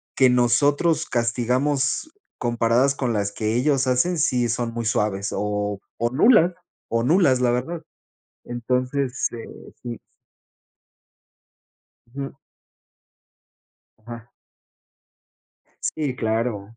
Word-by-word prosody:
que 130 Hz, -1 st, +5 dB
nosotros 140 Hz, +6 st, +2 dB
castigamos 130 Hz, -, 0 dB, 0.3 s
comparadas 120 Hz, +3 st, +2 dB
con 125 Hz, -4 st, -1 dB
las 100 Hz, -2 st, -1 dB
que 110 Hz, +1 st, -1 dB
ellos 135 Hz, +1 st, +2 dB
hacen, 155 Hz, +8 st, +2 dB
sí, 125 Hz, -5 st, +2 dB
son 115 Hz, 0 st, -2 dB
muy 115 Hz, -1 st, -3 dB
suaves 105 Hz, -2 st, 0 dB
o 105 Hz, 0 st, -2 dB, 0.2 s
o 120 Hz, +1 st, 0 dB
nulas 175 Hz, -, +5 dB, 0.4 s
o 115 Hz, 0 st, +1 dB
nulas, 140 Hz, -3 st, +3 dB
la 125 Hz, -, +3 dB
verdad, 135 Hz, +8 st, -2 dB, 0.6 s
entonces, 125 Hz, +2 st, -1 dB
eh, 115 Hz, -1 st, -7 dB, 0.4 s
sí. 120 Hz, -2 st, -6 dB, 2.2 s
Ujú. 140 Hz, 0 st, -5 dB, 1.7 s
Ajá. 115 Hz, +1 st, -11 dB, 1.5 s
Sí, 145 Hz, -5 st, -1 dB
claro. 110 Hz, -2 st, -2 dB
125 Hz, 95 wpm, -23 LUFS, 115-135 Hz, 2.2 s, que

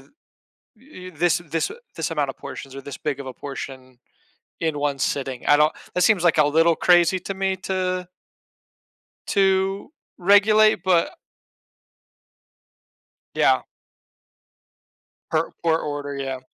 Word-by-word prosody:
th -, -, -22 dB, 0.7 s
y 200 Hz, -8 st, -12 dB
this 170 Hz, +2 st, +2 dB
this 165 Hz, -, -1 dB
a 435 Hz, -, -9 dB, 0.2 s
this -, -, -3 dB
amount 150 Hz, -4 st, -1 dB
of -, -, -7 dB
portions 135 Hz, 0 st, -9 dB
or 135 Hz, -, -7 dB
this 135 Hz, -3 st, -8 dB
big 145 Hz, -3 st, -3 dB
of 135 Hz, -, -7 dB
a 130 Hz, -, -6 dB
portion 130 Hz, -2 st, -8 dB, 0.6 s
in 160 Hz, -3 st, -1 dB
1 145 Hz, -1 st, -1 dB
sitting." 135 Hz, -2 st, -2 dB
I 145 Hz, -, +6 dB
don't 150 Hz, +1 st, +3 dB, 0.2 s
that 180 Hz, -, +1 dB
seems 195 Hz, -5 st, +3 dB
like 170 Hz, -2 st, +3 dB
a 150 Hz, -, +5 dB
little 165 Hz, +3 st, +3 dB
crazy 175 Hz, +2 st, +4 dB
to 195 Hz, +2 st, -5 dB
me 190 Hz, 0 st, -1 dB
to 185 Hz, -1 st, -2 dB, 1.2 s
to 195 Hz, +3 st, +1 dB, 0.3 s
regulate, 205 Hz, +1 st, +4 dB
but 180 Hz, -3 st, +2 dB, 2.2 s
Yeah. -, -, +3 dB, 1.7 s
Per 160 Hz, +1 st, 0 dB
per 165 Hz, -1 st, +2 dB
order, 145 Hz, -2 st, -5 dB
yeah. 135 Hz, -1 st, -4 dB
165 Hz, 135 wpm, -23 LUFS, 140-185 Hz, 2.2 s, I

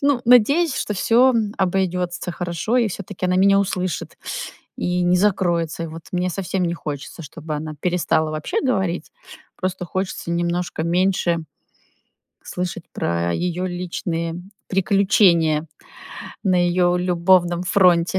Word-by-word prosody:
ну, 280 Hz, -3 st, +2 dB
надеюсь, 260 Hz, +7 st, +5 dB
что 210 Hz, -, -2 dB
всё 240 Hz, +7 st, +4 dB, 0.3 s
обойдётся 180 Hz, -2 st, -1 dB
хорошо 175 Hz, +7 st, -2 dB
и 235 Hz, -3 st, +2 dB
всё-таки 190 Hz, -1 st, -5 dB
она 180 Hz, 0 st, +1 dB
меня 195 Hz, +1 st, +5 dB
услышит 185 Hz, -3 st, -2 dB, 0.6 s
и 180 Hz, 0 st, 0 dB
не 175 Hz, +1 st, +3 dB
закроется. 175 Hz, -4 st, +1 dB
И 165 Hz, -, -4 dB
вот 160 Hz, +1 st, -9 dB
мне 180 Hz, 0 st, 0 dB
совсем 185 Hz, 0 st, -2 dB
не 170 Hz, -1 st, 0 dB
хочется, 150 Hz, -1 st, -6 dB
чтобы 155 Hz, +1 st, -6 dB
она 155 Hz, +1 st, -5 dB
перестала 170 Hz, -3 st, +1 dB
вообще 155 Hz, 0 st, -2 dB
говорить, 190 Hz, -, -1 dB, 0.5 s
просто 185 Hz, -1 st, -3 dB
хочется 185 Hz, -1 st, -3 dB
немножко 170 Hz, -1 st, -1 dB
меньше 175 Hz, 0 st, +1 dB, 1.1 s
слышать 180 Hz, -1 st, -5 dB
про 85 Hz, 0 st, -1 dB
её 180 Hz, +1 st, -2 dB
личные 175 Hz, -2 st, -3 dB, 0.3 s
приключения 185 Hz, -5 st, +3 dB, 0.8 s
на 185 Hz, -2 st, +3 dB
её 175 Hz, 0 st, +2 dB
любовном 175 Hz, 0 st, +2 dB
фронте. 180 Hz, -1 st, +3 dB
180 Hz, 125 wpm, -21 LUFS, 170-190 Hz, 1.1 s, надеюсь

